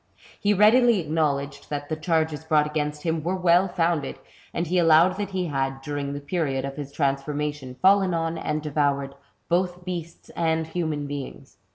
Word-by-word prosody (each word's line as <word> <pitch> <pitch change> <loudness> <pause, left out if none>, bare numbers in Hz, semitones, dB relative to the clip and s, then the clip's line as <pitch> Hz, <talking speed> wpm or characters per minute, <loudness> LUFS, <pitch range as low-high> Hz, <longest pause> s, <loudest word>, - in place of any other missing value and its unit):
He 205 - +2
readily 225 +2 +5
acknowledged 145 -3 -1
that 145 -1 -4
the 155 - -2
charges 160 -1 0
brought 155 -1 +3
against 150 -1 -3
him 160 -1 0
were 175 +4 -1
well 180 +1 +4
founded, 170 -5 -1 0.3
and 170 - -2
he 180 +2 +1
allowed 165 +2 +5
that 205 -1 -3
he 190 -2 -2
had, 135 -3 -2
during 145 -1 -3
the 145 - -4
period 140 -3 -2
of 140 0 -5
his 145 -2 -6
transform 140 0 -1
ation, 145 -4 -4
fallen 195 -1 +5
on, 165 0 -1
and 155 -1 -3
devoured, 140 -2 0 0.3
both 180 0 0
beasts 170 -2 -6
and 160 -1 0
human 160 -3 -2
beings. 140 -1 -7
155 Hz, 175 wpm, -25 LUFS, 145-175 Hz, 0.3 s, readily